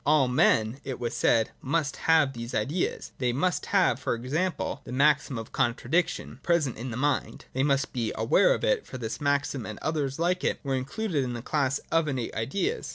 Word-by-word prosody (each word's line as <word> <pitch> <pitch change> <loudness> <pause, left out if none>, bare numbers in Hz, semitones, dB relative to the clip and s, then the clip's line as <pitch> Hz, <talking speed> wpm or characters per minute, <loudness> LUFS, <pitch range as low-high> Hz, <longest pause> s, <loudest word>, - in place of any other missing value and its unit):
All 145 -2 +4
men, 120 -1 +3
it 130 -2 -5
was 120 -1 -3
said, 115 0 +2
must 140 +1 0
have 160 -4 +3
these 115 0 -6
ideas; 145 +12 -1
they 125 -2 +1
must 175 +8 0
have, - - +3
for - - -1
example, 145 +4 -2
the - - -9
maxim 140 0 +2
of 115 -1 -7
contradiction, 130 +2 0
present 165 -7 +1
in 125 +4 -5
the 115 - -5
mind, 130 -5 -1
— - - -36
they 130 - 0
must 135 -1 +1
be 115 -3 -1
aware 115 - +4
of - - -7
it; - - +1
for 130 - -7
this 115 +3 -5
maxim 140 -3 0
and 110 -1 -6
others 145 -4 -1
like 180 +2 0
it - - 0
were 135 -2 -1
included 145 - -1
in 125 -1 -3
the 120 -1 -6
class 140 -2 +1
of 165 -1 +2
Innate 130 -5 -2
ideas. 200 - -2
135 Hz, 205 wpm, -27 LUFS, 120-155 Hz, -, All